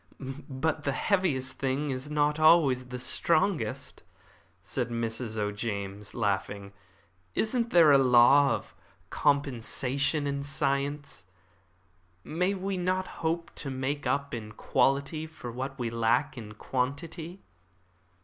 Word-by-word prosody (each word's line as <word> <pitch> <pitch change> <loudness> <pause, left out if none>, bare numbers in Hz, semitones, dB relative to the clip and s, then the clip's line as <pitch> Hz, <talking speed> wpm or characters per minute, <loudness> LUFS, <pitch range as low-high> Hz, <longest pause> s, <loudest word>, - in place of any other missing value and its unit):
"But 155 +3 -1
the 140 - 0
heaviest 145 -9 0
thing 140 +2 -1
is 130 +2 -4
not 150 0 +1
always 155 -6 +5
the 125 0 -6
strongest," 125 - 0 0.6
said - - -2
Mrs. 115 -1 -3
O'James, 105 -1 -3
laughing. 100 -2 -2 0.6
"Isn't 235 +1 0
there 165 -6 +6
a 140 - +7
law 135 +2 +6
of 105 - -9 0.4
compensation 140 +1 +1
in 140 0 -2
science? 140 -1 -2 1.0
May 180 +5 0
we 190 0 -3
not 185 +1 0
hope 165 +1 -1
to 140 - -3
make 135 +2 -2
up 140 0 -1
in 110 -2 -6
quality 140 +7 0
for 155 -6 -8
what 135 +3 -5
we 120 -3 -2
lack 115 +5 +1
in 110 -4 -8
quantity?" 155 - -4
140 Hz, 120 wpm, -28 LUFS, 120-155 Hz, 1.0 s, a